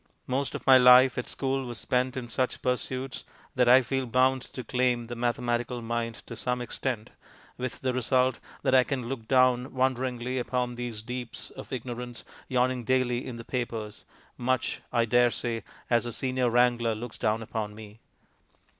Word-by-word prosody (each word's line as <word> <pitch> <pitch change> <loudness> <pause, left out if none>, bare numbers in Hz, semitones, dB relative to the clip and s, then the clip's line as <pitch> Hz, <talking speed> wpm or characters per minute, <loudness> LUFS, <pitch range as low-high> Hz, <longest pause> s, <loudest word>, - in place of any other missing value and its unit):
Most 130 0 -1
of - - -6
my 130 -1 +8
life 125 +1 +8
at 125 - -5
school 135 0 -1
was 120 -1 -5
spent 125 +3 0
in 125 -2 -4
such 125 +2 -2
pursuits 130 +1 -2 0.3
that 125 -3 +3
I 130 +1 +8
feel 130 +2 -2
bound 130 +2 +3
to 130 - -5
claim 125 0 +1
the 120 +1 -6
mathematical 120 0 -1
mind 115 0 -3
to 115 - -8
some 125 +2 -2
extent, 120 -2 -3 0.4
with 125 0 -5
the 130 -1 0
result 130 0 +2 0.2
that 130 - +2
I 130 -1 +7
can 130 -3 -3
look 120 -3 -5
down 130 -1 +3
wonderingly 130 -1 0
upon 125 0 -1
these 120 -3 -5
deeps 125 0 -5
of - - -10
ignorance 120 -1 -5 0.2
yawning 125 -1 +1
daily 125 0 +1
in 125 - -6
the 115 0 -9
papers 115 -4 -4 0.4
much, 130 0 0
I 115 -1 +2
dare 120 +1 +4
say, 115 -1 -3 0.2
as 120 0 +2
the 120 - -3
senior 130 -1 0
wrangler 120 -1 +3
looks 115 +1 -7
down 110 +1 +1
upon 105 -1 -4
me. 110 0 -11
125 Hz, 170 wpm, -28 LUFS, 120-130 Hz, 0.4 s, my